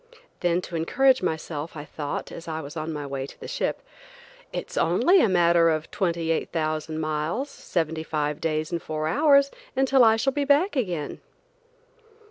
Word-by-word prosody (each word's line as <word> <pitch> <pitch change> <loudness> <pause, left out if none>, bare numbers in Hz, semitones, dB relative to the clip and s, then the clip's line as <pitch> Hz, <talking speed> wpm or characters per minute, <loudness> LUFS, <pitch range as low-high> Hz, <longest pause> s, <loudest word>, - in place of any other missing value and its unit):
Then 175 0 +1
to 180 - -7
encourage 260 +11 +3
myself 160 0 -3
I 145 - -6
thought, 145 -1 -5
as 170 - -9
I 160 -1 -3
was 150 0 -8
on 155 0 -3
my 150 -2 -4
way 135 -1 -4
to - - -14
the - - -8
ship: - - -2 0.7
"It's - - -5
only 370 +1 +4
a 220 - +3
matter 170 -2 +4
of 155 -1 -2
28,000 165 -3 -1
miles, 155 +5 -1
and 275 - -3 0.2
seventy 160 -2 -1
five 150 -2 -2
days 155 0 -1
and 170 -1 -2
four 155 0 -3
hours, 280 - +4 0.2
until 265 -1 +4
I 220 -1 +6
shall 265 +4 0
be 290 - 0
back 290 +7 +3
again." 180 - -2
165 Hz, 170 wpm, -25 LUFS, 155-225 Hz, 0.7 s, I